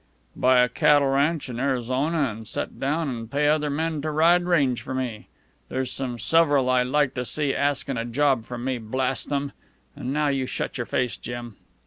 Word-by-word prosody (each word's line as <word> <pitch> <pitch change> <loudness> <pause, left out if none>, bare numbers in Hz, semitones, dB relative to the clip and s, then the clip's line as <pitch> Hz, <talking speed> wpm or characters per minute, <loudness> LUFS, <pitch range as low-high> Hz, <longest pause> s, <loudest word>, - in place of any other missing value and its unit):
"Buy 130 0 +4
a 125 - +4
cattle 145 +1 +3
ranch 145 +4 +1
in 120 -2 -6
Arizona 130 +4 0
an' 110 +1 -8
set - - -5
down 150 +4 0
an' 115 -4 -4
pay 145 +5 +1
other 150 0 +2
men 155 +1 -2
to 155 - -2
ride 170 +3 +4
range 140 -9 +2
for 130 - -5
me. 120 -5 -4 0.4
There's 130 -1 -2
some 125 -3 -4
several 145 -3 +3
I'd 125 -1 +2
like 145 0 +1
to 125 - -3
see 145 +2 -1
askin' 140 -2 0
a 115 - -2
job 130 -1 +1
from 120 0 -6
me, 130 -1 -1
blast 130 +3 -1
them! 140 -1 -1 0.4
An' 130 - -4
now 150 +1 +1
you 135 -2 -1
shut 130 - -4
your 120 - -3
face, 125 -2 -1
Jim. 120 -2 -7
135 Hz, 195 wpm, -24 LUFS, 125-145 Hz, 0.4 s, Buy